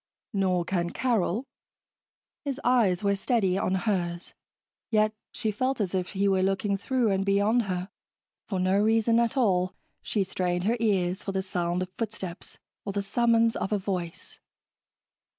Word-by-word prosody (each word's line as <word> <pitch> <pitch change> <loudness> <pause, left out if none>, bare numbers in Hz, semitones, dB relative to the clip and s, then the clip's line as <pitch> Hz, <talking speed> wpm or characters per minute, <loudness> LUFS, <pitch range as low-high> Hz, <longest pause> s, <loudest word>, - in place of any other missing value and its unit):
"Nor 185 -3 +1
can 175 -1 -1
Carol." 230 0 0 1.0
His 280 -2 -3
eyes 215 -7 +3
were 200 0 +2
steady 195 -2 +1
on 190 -1 0
hers, 180 -4 -2 0.6
yet 215 -1 +3 0.2
she 220 - -1
felt 255 +5 -1
as 195 -4 -1
if 185 0 -2
he 200 0 +1
were 190 -1 +3
looking 195 +1 +1
through 235 +2 0
and 195 0 +1
beyond 205 +4 +2
her. 180 -1 -3 0.6
For 190 - -2
no 185 +2 +2
reason 225 +2 +3
at 235 +3 +1
all, 185 -7 +2 0.3
she 205 - 0
strained 180 -1 -1
her 225 +5 +1
ears 190 -5 +1
for 195 - -4
the 190 0 -1
sound 175 -1 -1
of 185 - -9
footsteps 195 -6 -5 0.3
or 200 - -4
the 200 0 -1
summons 230 +2 +3
of 195 - -2
a 210 - +2
voice. 185 -3 -5
195 Hz, 160 wpm, -27 LUFS, 185-225 Hz, 1.0 s, eyes